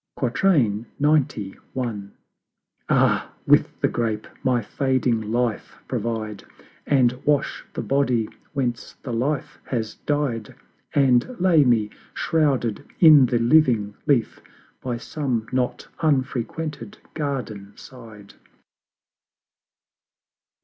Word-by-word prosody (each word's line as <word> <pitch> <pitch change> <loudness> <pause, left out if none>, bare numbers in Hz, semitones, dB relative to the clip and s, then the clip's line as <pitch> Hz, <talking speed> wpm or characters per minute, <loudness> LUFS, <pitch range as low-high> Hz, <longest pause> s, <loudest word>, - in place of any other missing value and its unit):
XCI. 125 - +1 1.3
Ah, - - +2
with - - +3
the - - +4
Grape 110 -3 -2 0.2
my 125 -2 +2
fading 120 -2 0
life 120 -1 -1
provide, 110 -3 -3 0.4
And 125 -3 +2
wash 145 -1 0
the - - -3
Body 130 -5 +1 0.3
whence 125 -5 -2
the 125 - -4
Life 135 +5 -2
has 115 -4 -3
died, 140 -7 -1 0.4
And 135 - +3
lay 175 -5 +5
me, 115 -5 +2 0.2
shrouded 135 -9 0 0.2
in 150 -6 +8
the 120 - +1
living 115 -4 +3
Leaf, 130 -6 +1 0.4
By 125 -2 -3
some 125 -3 -2
not 125 -1 -1
unfrequented 135 -2 -2 0.2
Garden 125 -10 -4
side. 110 -5 -13
125 Hz, 95 wpm, -23 LUFS, 115-140 Hz, 1.3 s, in